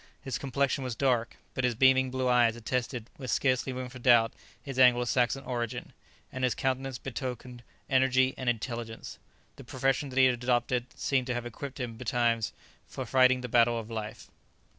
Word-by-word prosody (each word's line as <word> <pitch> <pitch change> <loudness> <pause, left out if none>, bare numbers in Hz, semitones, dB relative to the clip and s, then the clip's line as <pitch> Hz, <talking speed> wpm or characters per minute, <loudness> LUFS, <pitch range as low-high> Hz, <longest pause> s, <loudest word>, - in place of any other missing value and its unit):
His 135 - -4
complexion 140 0 0
was 125 -3 -4
dark, 120 -3 0 0.2
but 130 - -2
his 125 -2 +1
beaming 130 +1 +4
blue 130 0 -1
eyes 120 -2 +4
attested, 120 0 -3
with 130 -2 -6
scarcely 130 -1 +1
room 130 0 -5
for 125 0 -11
doubt, 120 -2 +4 0.3
his 135 -2 -6
Anglo 125 -1 +6
Saxon 125 +2 +1
origin, 120 -1 -4 0.4
and 130 - -5
his 125 - +2
countenance 130 -1 -2
betokened 125 -1 -6 0.3
energy 130 -1 +3
and 130 - -2
intelligence. 115 -1 -5 0.4
The 135 - -10
profession 135 +2 -1
that 130 - -8
he 130 - +7
had 130 - +4
adopted 125 0 +1
seemed 130 -2 0
to 125 - -1
have 120 0 -3
equipped 130 +4 -7
him 120 -3 -4
betimes 115 -2 0 0.4
for 130 - -6
fighting 130 +1 +4
the 125 - -4
battle 120 0 +3
of 115 0 -6
life. 110 -1 -6
125 Hz, 180 wpm, -29 LUFS, 120-130 Hz, 0.4 s, he